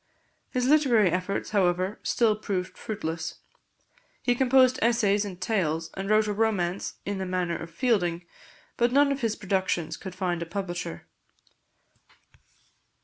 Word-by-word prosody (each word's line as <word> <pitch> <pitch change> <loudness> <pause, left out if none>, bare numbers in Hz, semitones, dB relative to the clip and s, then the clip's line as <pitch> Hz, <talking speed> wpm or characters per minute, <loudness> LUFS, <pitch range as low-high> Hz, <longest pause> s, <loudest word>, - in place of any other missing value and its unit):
His 250 -2 -1
literary 255 - +4
efforts, 185 +2 -2
however, 185 0 +1
still 225 -3 +2
proved 195 -4 -3
fruitless. 165 -6 -4 0.9
He 245 - +3
composed 255 0 +4
essays 220 -3 +3
and 185 -3 -7
tales, 165 -5 -1
and 195 +1 -5
wrote 215 0 +4
a 210 - -1
romance 200 -4 0
in 200 -1 -3
the 190 - -2
manner 180 -2 -1
of 165 - -6
Fielding, 175 -4 0 0.5
but 240 0 +2
none 280 +2 +4
of 275 0 -2
his 225 -2 0
productions 185 -5 -1
could 190 -2 -8
find 180 -2 -1
a 170 - -4
publisher. 175 - -5
195 Hz, 140 wpm, -27 LUFS, 175-225 Hz, 0.9 s, literary